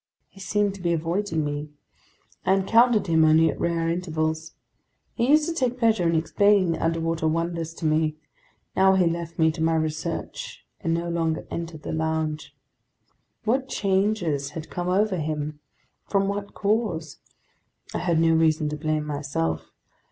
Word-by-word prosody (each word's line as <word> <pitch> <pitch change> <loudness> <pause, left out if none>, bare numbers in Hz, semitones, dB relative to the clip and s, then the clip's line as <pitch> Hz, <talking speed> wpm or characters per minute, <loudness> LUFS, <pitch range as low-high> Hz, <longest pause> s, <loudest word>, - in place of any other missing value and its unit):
He 195 - -17
seemed 205 +1 0
to 195 - -11
be 170 -1 +1
avoiding 165 0 -1
me. 145 +1 -4 0.7
I 190 - +3
encountered 225 +3 +4
him 160 -3 +3
only 155 +1 +5
at - - -9
rare 170 -1 0
intervals. 160 -2 -2 0.6
He 235 +1 0
used 305 +1 +5
to 335 - -1
take 255 -5 0
pleasure 220 -8 +2
in 165 - +1
explaining 185 +3 +3
the 165 - -2
underwater 165 0 0
wonders 165 0 -1
to 165 - -6
me; 155 0 +2 0.6
now 190 0 +5
he 185 -2 +3
left 170 0 -2
me 160 -1 +4
to 160 +1 -6
my 165 0 +2
research 155 -1 -4
and 165 0 0
no 170 +1 -2
longer 165 -1 -1
entered 165 -2 -5
the - - -4
lounge. 160 -1 -2 0.9
What 260 +4 0
changes 190 -8 0
had 160 - -7
come 175 0 -2
over 195 +1 +2
him? 150 -1 -3 0.5
From 195 -1 +1
what 200 0 -4
cause? 200 -7 -1 0.8
I - - -1
had 170 -3 +1
no 165 0 +4
reason 160 -1 +2
to 150 - -4
blame 155 0 -1
myself. 140 - -2
165 Hz, 160 wpm, -25 LUFS, 160-195 Hz, 0.9 s, only